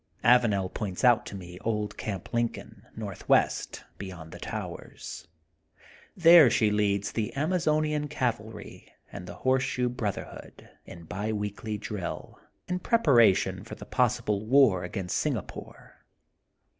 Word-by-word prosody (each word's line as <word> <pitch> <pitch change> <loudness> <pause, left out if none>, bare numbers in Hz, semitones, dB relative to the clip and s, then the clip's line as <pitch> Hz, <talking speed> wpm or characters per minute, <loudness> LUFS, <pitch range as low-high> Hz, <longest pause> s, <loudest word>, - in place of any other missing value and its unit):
' - - -43
' - - -35
Avanel 115 -6 +4
points 100 -2 -4
out 120 -3 +4
to - - -7
me 90 -1 -9
old 105 -1 -2
Camp 100 -4 -6
Lincoln, 115 -2 -3
northwest, 105 -4 0 0.2
beyond 90 -5 -8
the - - -10
towers. - - -7 0.9
There 170 -5 +8
she 110 -1 +2
leads 100 -1 +1
the 110 -3 -2
Amazonian 155 -1 0
Cavalry 120 -6 -4 0.2
and 90 - -8
the 85 - -8
Horse 130 0 +4
shoe 125 -1 -1
Brotherhood 110 -5 -6 0.2
in 85 - -10
bi 105 +5 -4
weekly 105 +1 -4
drill, 105 -3 -6 0.3
in 180 0 -2
prep 230 +5 +1
aration 100 - +4
for 110 - -9
the - - -10
possible 120 -5 0
war 120 -8 +5
against 90 0 -2
Singa - - -1
pore. - - -12
110 Hz, 140 wpm, -28 LUFS, 100-125 Hz, 0.9 s, There